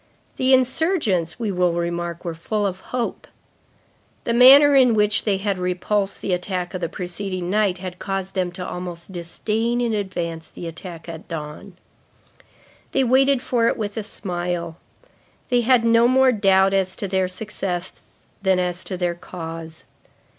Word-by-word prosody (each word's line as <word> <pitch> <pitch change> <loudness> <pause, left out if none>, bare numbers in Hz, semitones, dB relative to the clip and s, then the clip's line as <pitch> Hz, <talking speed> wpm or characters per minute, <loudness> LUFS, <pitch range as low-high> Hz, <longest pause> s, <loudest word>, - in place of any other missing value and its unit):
The 260 0 +2
insurgents, 255 - +1
we 220 -3 -1
will 180 -2 +1
remark, 170 0 -3
were 170 - -2
full 205 +6 -2
of 190 -1 -2
hope. 240 +3 -4 1.0
The 235 - 0
manner 275 +4 +8
in 250 -4 +5
which 210 0 +2
they 200 -3 +2
had 195 -1 -2
repulsed 195 +3 -1
the 190 - -1
attack 180 0 -3
of 185 - -4
the 170 - -1
preceding 180 0 -4
night 205 -3 +2
had 180 -1 -7
caused 195 -1 -3
them 185 -2 -1
to 180 0 -6
almost 180 0 -7
disdain 215 +7 -2
in 235 -2 0
advance 175 -5 -3
the - - -9
attack 165 0 -8
at 165 -1 -8
dawn. 160 +4 -7 1.2
They 270 - +3
waited 265 +1 +3
for 235 -2 +1
it - - +1
with 205 -2 -4
a 220 - -2
smile. 175 -5 -4 0.7
They 245 -2 +3
had 240 -1 +4
no 230 +1 +5
more 260 +1 +5
doubt 195 -3 +3
as 190 -1 +1
to 200 - -4
their 190 -1 +1
success 185 -2 -5 0.3
than 190 -1 +3
as 180 0 -2
to 185 - -4
their 175 -1 0
cause. 165 -2 -8
190 Hz, 160 wpm, -22 LUFS, 175-225 Hz, 1.2 s, manner